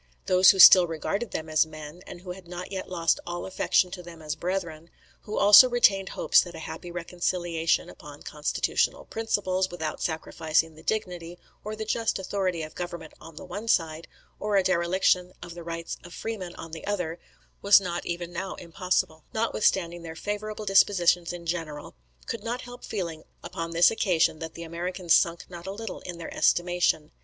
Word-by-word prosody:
Those 185 0 +6
who 195 - +6
still 185 -1 +10
regarded 200 +8 -3
them 160 - -5
as 155 0 +3
men, 155 +2 -10
and 175 - -10
who 180 -1 -7
had 180 -1 -10
not 180 +2 -7
yet 190 -1 -5
lost 170 -2 +1
all 175 0 -4
affection 185 -1 +1
to 180 - -7
them 170 -1 -12
as 155 -1 -4
brethren, 170 -2 -4 0.4
who 210 - -4
also 205 +5 +9
retained 200 -6 +3
hopes - - +4
that 175 -2 -8
a 160 - -7
happy 175 - -7
reconciliation 175 -1 -1
upon - - -12
constitutional - - -1
principles, 190 -4 -1
without 160 -3 -5
sacrificing 160 0 -1
the 155 - -15
dignity 175 -3 -3 0.3
or 215 +1 -5
the 220 0 -5
just 225 +1 0
authority 185 -3 -2
of 155 - -8
government 170 -3 -7
on 165 - -12
the - - -9
one 205 +5 -7
side, 165 -5 0 0.3
or 210 -1 -1
a 195 - +4
dereliction 180 0 +1
of 170 - -9
the 175 - -9
rights 165 0 -5
of 175 - -11
freemen 200 -6 -5
on 165 - -9
the 160 +3 -8
other, 180 -5 -2 0.4
was 200 0 +7
not 175 -3 -4
even 175 0 -5
now 190 +2 -4
impossible, 170 -2 -2
notwithstanding 190 -6 +1
their 165 -1 -8
favourable 210 +3 -4
dispositions 180 -3 +3
in 175 -1 -8
general, 165 -3 -4 0.3
could 225 -3 -5
not 240 +2 -3
help 245 0 -11
feeling 170 -7 -4 0.2
upon 165 0 -5
this 170 +1 +5
occasion 175 -7 +1
that 160 -1 -7
the 170 - -7
Americans 170 +1 -1
sunk 170 0 +2
not 175 0 -10
a - - -3
little 225 +3 -6
in 180 -2 -8
their 170 - -7
estimation. 175 -3 +1
175 Hz, 185 wpm, -26 LUFS, 165-195 Hz, 0.4 s, still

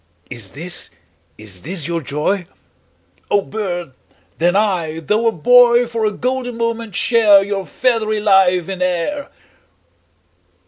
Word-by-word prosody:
'Is 115 -6 -6
this, 175 +5 -3 0.5
is 100 -4 -9
this 170 -2 -5
your 170 -1 -2
joy? 160 +6 -2 0.8
O 205 - +3
bird, 175 -9 -5 0.5
then 175 +3 +2
I, 180 -7 0
though 210 +9 0
a - - +3
boy 240 +6 +5
10 245 - -2
For 230 -2 -2
a - - -1
golden 250 +1 -3
moment 230 -2 -3
share 215 -4 +5
Your 195 -1 -4
feathery 220 -4 0
life 190 -4 +3
in 190 -2 -6
air! 180 - -2
195 Hz, 135 wpm, -18 LUFS, 170-230 Hz, 0.8 s, boy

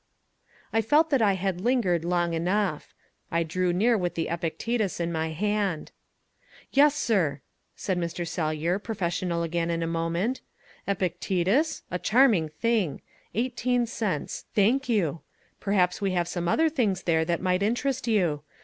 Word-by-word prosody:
I 225 - +3
felt 300 +8 +3
that 270 -4 +3
I 205 -3 +4
had 190 -1 -2
lingered 205 -8 +1
long 175 -1 0
enough. 180 -1 -1 0.3
I 170 0 +1
drew 180 +2 0
near 220 +7 +3
with 180 -4 -1
the 165 - -2
Epictetus 175 +6 -2
in 170 0 -1
my 160 -1 -1
hand. 200 0 -1 0.8
"Yes, 290 +1 +5
sir," 175 - +1 0.3
said 185 -2 -2
Mr. 170 0 -3
Sellyer, 165 +2 -1
professional 175 -5 -2
again 165 0 -1
in 165 0 -1
a - - 0
moment. 165 +8 -1 0.5
"Epictetus? 195 - 0
A 180 - -2
charming 215 - +4
thing. 205 -2 -1 0.3
Eighteen 245 +1 0
cents. 210 -9 -3
Thank 245 +7 +3
you. 170 -9 +1 0.4
Perhaps 190 -2 +1
we 195 -2 0
have 175 -2 0
some 175 -1 -3
other 320 - +3
things 220 - 0
there 160 -2 +2
that 170 +1 -1
might 185 0 +1
interest 250 +4 0
you. 175 -10 +1
185 Hz, 150 wpm, -27 LUFS, 170-225 Hz, 0.8 s, Yes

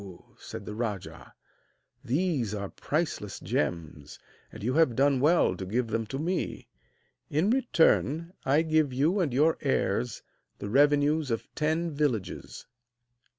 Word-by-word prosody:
said - - -8
the 105 - -6
rajah, 105 -4 -5 0.7
'these 135 - 0
are 100 -1 -4
priceless 145 - -3
gems, 80 -4 -3 0.3
and 110 - -10
you 125 +4 0
have 155 -6 +3
done 140 +1 +3
well 150 - +3
to 95 - -6
give 115 +5 -1
them 115 0 -2
to 135 - -4
me. 175 +5 -3 0.6
In 160 +9 +2
return 170 - +2
I 145 +4 +3
give 155 -3 +2
you 155 +10 +2
and 165 -7 +1
your 150 +6 +2
heirs 120 -3 -1 0.3
the 100 - -6
revenues 145 +2 +3
of 115 -1 -3
ten 160 +2 0
villages.' 140 - -3
140 Hz, 135 wpm, -28 LUFS, 115-160 Hz, 0.7 s, have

